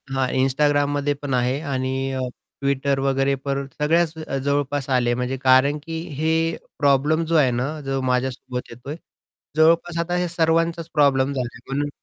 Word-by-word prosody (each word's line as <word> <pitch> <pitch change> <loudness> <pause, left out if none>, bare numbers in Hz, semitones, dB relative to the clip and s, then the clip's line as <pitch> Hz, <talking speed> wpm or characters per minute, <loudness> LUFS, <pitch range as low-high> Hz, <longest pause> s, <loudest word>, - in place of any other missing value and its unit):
हां, 135 -1 0
Instagramमध्ये 145 +2 +2
पण 145 -2 -3
आहे 125 +2 +1
आणि 130 0 -1
अ, 130 - -2 0.4
Twitter 140 0 +1
वगैरे 135 0 +1
पण 140 0 -3
सगळ्याच 160 +2 +2 0.3
जवळपास 140 -1 -1
आले. 125 -2 +2
म्हणजे 125 +2 -2
कारण 130 +3 +5
की 165 0 -5 0.2
हे 160 +2 +1 0.5
प्रॉब्लेम 145 +3 +3
जो 165 +1 0
आहे 140 -5 +4
ना 125 +3 -1 0.2
जो 135 0 -1
माझ्यासोबत 125 0 -2
येतोय. 125 +5 -7 0.6
जवळपास 165 +2 +3
आता 175 +1 -1
हे 180 0 0
सर्वांचाच 165 0 +1
प्रॉब्लेम 140 -2 +3
झाला 130 -3 -2
आहे - - -12
म्हणून. 145 +1 -1
140 Hz, 155 wpm, -22 LUFS, 130-150 Hz, 0.6 s, कारण